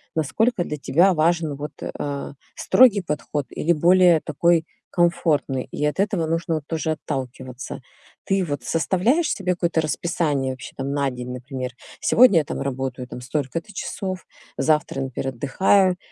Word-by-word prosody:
насколько 180 - +1
для 150 - -5
тебя 175 +7 +3
важен 160 -2 +1
вот, 145 +2 -6
э, - - -4
а, 140 -1 -4 0.2
строгий 240 -6 +5
подход 150 -2 -3
или 170 - 0
более 175 +1 +5
такой 165 +2 +2 0.3
комфортный, 170 -6 +1
и 150 - -2
от 150 +5 -1
этого 200 -4 +1
нужно 165 0 -1
вот 155 - -3
тоже 160 -1 -1
отталкиваться. 130 -4 -5 0.4
Ты 195 -1 +1
вот 145 -5 -4
составляешь 190 - +1
себе 190 -3 -1
какое-то 170 -2 0
расписание 150 -4 -1
вообще 130 0 -10
там 135 +1 -3
на 140 -1 0
день, 125 0 -6
например? 125 0 -5 0.3
"Сегодня 230 -8 +6
я 150 - -2
там - - -4
работаю 130 -2 -3
там 125 - -8
столько-то 150 - -3
часов, 190 -1 -4 0.3
завтра, 150 -3 +1
например, 135 0 -3
отдыхаю- 185 - +3
155 Hz, 155 wpm, -23 LUFS, 135-175 Hz, 0.4 s, Сегодня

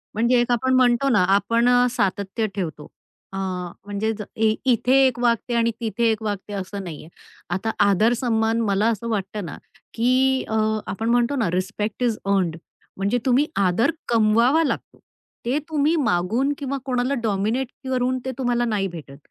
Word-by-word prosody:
म्हणजे 240 +2 +3
एक 240 - -1
आपण 260 +2 +1
म्हणतो 255 +1 +3
ना, 215 -7 +4
आपण 230 +4 +2
अ, 245 0 +5
सातत्य 200 -1 -1
ठेवतो. 160 -6 -4 0.5
अ, - - -4 0.5
म्हणजेच 210 +1 -2
ए 220 0 +2
इथे 250 +1 +2
एक 245 -2 -3
वागते 240 0 +1
आणि 230 0 +2
तिथे 230 +1 0
एक 220 - -3
वागते 205 -1 -4
असं 195 0 -5
नाहीये. 160 -3 -8 0.4
आता 190 +5 -1 0.2
आदर-सन्मान 225 +2 +2
मला 205 0 +1
असं 230 +1 -3
वाटतं 205 -2 -3
ना, 150 - -7 0.4
की 260 +3 +2
अ, 220 - -1 0.3
आपण 225 +4 -2
म्हणतो 245 +3 +2
ना, 225 -9 0
रिस्पेक्ट 205 +5 -2
इज 230 -3 +1
अर्न्ड. 190 -5 +1 0.4
म्हणजे 200 +5 0
तुम्ही 265 +3 +3
आदर 200 - +2 0.2
कमवावा 235 +7 +3
लागतो. 280 - -4 0.5
ते 255 +5 +1
तुम्ही 310 +1 +2
मागून 235 - +1
किंवा 275 -1 -3
कोणाला 255 +1 0
डॉमिनेट 220 +4 0 0.2
करून 255 0 0
ते 260 - -2
तुम्हाला 240 -2 0
नाही 205 -4 0
भेटत. 150 -6 -10
230 Hz, 160 wpm, -23 LUFS, 200-245 Hz, 0.5 s, अ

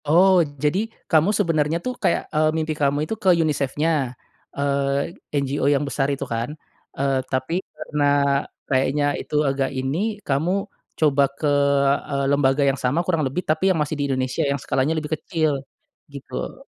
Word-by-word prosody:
Oh, 185 +5 +6 0.3
jadi, 150 +6 +2 0.3
kamu 160 +3 +4
sebenarnya 165 -4 +1
tuh 255 - -1
kayak, - - +2
eee, 155 0 +3
mimpi 160 0 -1
kamu 140 0 +2
itu 220 - -3
ke 190 - +4
UniSafe-nya? 150 0 0 0.7
Eee, 140 +2 0 0.3
NGO 140 +1 -1
yang 140 +1 +1
besar 140 -1 0
itu 135 - -4
kan, 115 +3 -2 0.5
eee, 135 0 +1
tapi, 130 +5 -1 0.2
karena 150 -1 -2 0.7
kayaknya 135 +2 +2 0.2
itu - - -6
agak 135 0 0
ini, 130 +3 -1 0.3
kamu 145 +5 +1 0.5
coba 145 -3 +4
ke, - - -3 0.6
eee, 140 0 0
lembaga 140 0 +3
yang 135 0 -1
sama 145 +8 +1
kurang 165 -4 +1
lebih, 160 +8 -3
tapi 160 +5 +2
yang 185 - +2
masih 150 +1 -1
di - - +1
Indonesia, 130 +3 -1
yang 140 - +1
skalanya 145 +5 0
lebih 155 0 -3
kecil, 155 -4 0 0.5
gitu. 140 -1 -7
145 Hz, 155 wpm, -22 LUFS, 135-160 Hz, 0.7 s, Oh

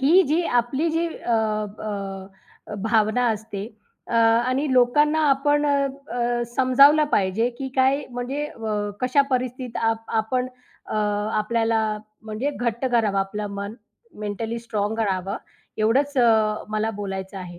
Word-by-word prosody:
ही 335 +8 +6
जी 315 +5 +1 0.2
आपली 270 +7 -2
जी 330 +2 0
अ, 240 - -4
अ, 205 -3 -4
अ, - - -3
भावना 220 +2 +2
असते 210 -1 -5 0.4
अ, - - -2
आणि 235 +5 +3
लोकांना 295 +5 +4
आपण 290 +2 +2
अ, 280 -1 +2 0.2
अ, 240 0 0
समजावलं 280 +4 +6
पाहिजे, 200 +5 +2
की 270 -1 -3
काय 265 +2 +3
म्हणजे 265 +5 -3
व 210 -2 -2
कशा 255 +3 +3
परिस्थितीत 255 -1 -2
आप 225 0 -4 0.2
आपण 250 +3 -1 0.4
अ, - - -5 0.4
आपल्याला 220 -1 0 0.2
म्हणजे 220 +6 -3
घट्ट 240 -2 -2
करावं, 225 -6 +2
आपलं 205 +2 -2
मन 200 +2 -5 0.5
मेंटली 220 +3 -3
स्ट्राँग 220 -2 -2
करावं, 195 -3 -1 0.4
एवढंच 265 +7 +1
अ, 220 -3 +3
मला 215 +1 -1
बोलायचं 195 -1 -5
आहे. 175 -2 -9
230 Hz, 135 wpm, -23 LUFS, 210-260 Hz, 0.5 s, ही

